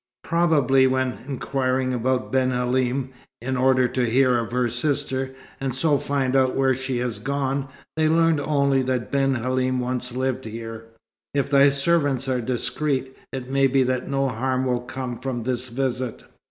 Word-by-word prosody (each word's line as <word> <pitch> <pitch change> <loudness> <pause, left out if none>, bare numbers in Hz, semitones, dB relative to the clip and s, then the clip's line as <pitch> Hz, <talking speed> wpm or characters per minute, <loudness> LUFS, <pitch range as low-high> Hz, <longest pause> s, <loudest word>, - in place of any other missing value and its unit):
Probably, 145 -6 +3
when 130 -1 0
inquiring 130 -1 -1
about 125 +1 -1
Ben 130 -1 +2
Halim, 125 +1 0 0.3
in 130 +3 -3
order 130 0 +3
to 125 -1 0
hear 130 +1 +4
of 115 -1 -4
her 125 0 +1
sister, 130 +1 -1 0.2
and 135 -2 -2
so 145 +1 +2
find 135 -2 -1
out 130 -1 +3
where 135 -1 +3
she 130 0 -3
has 120 -2 -2
gone, 135 0 -1 0.3
they 155 0 +2
learned 165 -1 +3
only 140 -2 +2
that 130 -2 -2
Ben 135 -1 +2
Halim 130 +1 0
once 125 0 -2
lived 130 0 -2
here. 115 0 -7 0.5
If 140 0 0
thy 140 0 +6
servants 140 -2 +1
are 130 -2 0
discreet, 130 +2 -2 0.2
it 130 -1 -6
may 135 0 +4
be 135 0 +3
that 130 0 -1
no 135 0 0
harm 130 +2 -1
will 125 -1 0
come 125 -1 -5
from 125 -2 -3
this 125 +1 -2
visit." 125 -1 -3
130 Hz, 165 wpm, -23 LUFS, 125-135 Hz, 0.5 s, thy